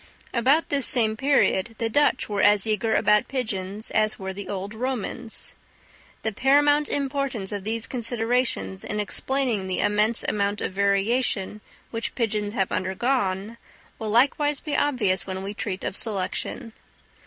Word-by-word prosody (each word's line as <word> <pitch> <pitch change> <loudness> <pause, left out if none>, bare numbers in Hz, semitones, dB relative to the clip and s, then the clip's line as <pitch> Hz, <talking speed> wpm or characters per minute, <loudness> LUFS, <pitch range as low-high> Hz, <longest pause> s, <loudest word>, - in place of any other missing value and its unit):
About 265 +7 +3
this 280 -2 +1
same 220 -3 +2
period 235 -5 +2
the 230 - 0
Dutch 275 +2 +2
were 205 -2 -1
as 205 0 +5
eager 220 +1 +1
about 210 +3 +3
pigeons 215 -5 -3
as 215 0 +2
were 190 0 -5
the 200 +1 -7
old 200 +1 -4
Romans. 240 -1 -1 0.7
The 220 - 0
paramount 290 +5 +3
importance 275 -7 -2
of 205 -2 -4
these 225 +2 -1
considerations 230 - -1
in 210 - -3
explaining 235 -1 -1
the 185 - -1
immense 210 +2 +2
amount 205 0 0
of - - -3
variation 200 +1 +1 0.3
which 230 0 -3
pigeons 210 -2 -1
have 195 -4 0
undergone, 200 +1 -1 0.4
will 220 - -3
likewise 280 +5 +3
be 300 - -3
obvious 210 -11 +1
when 190 0 -4
we 200 +1 -4
treat 200 -2 -4
of - - -3
Selection. 215 +1 -2
220 Hz, 145 wpm, -25 LUFS, 200-255 Hz, 0.7 s, as